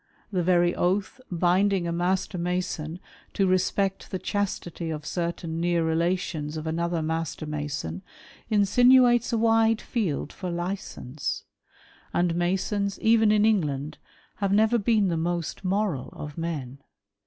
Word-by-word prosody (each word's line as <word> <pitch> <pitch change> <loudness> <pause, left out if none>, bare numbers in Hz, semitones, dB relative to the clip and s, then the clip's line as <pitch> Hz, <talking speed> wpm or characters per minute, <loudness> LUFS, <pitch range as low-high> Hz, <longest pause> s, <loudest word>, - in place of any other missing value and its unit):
The 185 -3 +1
very 175 0 +3
oath 195 +8 -1
binding 180 +1 +2
a - - -1
Master 180 +2 -1
Mason 175 -2 -2 0.3
to 195 - +2
respect 190 +1 0
the 190 - -2
chastity 180 -4 -3
of 155 -1 -5
certain 170 -1 -3
near 170 -1 +1
relations 160 -2 -1
of 155 - -5
another 170 +1 -1
Master 160 0 -3
Mason, 145 - -4 0.5
insinuates 240 +3 +5
a 230 - +1
wide 225 0 +3
field 175 - -2
for 185 -2 -5
licence; 175 -6 -4 0.7
and 175 -1 +2
Masons, 195 +3 -1
even 220 -1 +4
in 210 0 +4
England, 150 -8 0 0.4
have 200 -2 0
never 220 +3 +4
been 210 -2 +2
the 165 - 0
most 170 +1 -2
moral 190 -8 -1
of 150 -1 -8
men. 145 -6 -4
175 Hz, 130 wpm, -26 LUFS, 165-200 Hz, 0.7 s, insinuates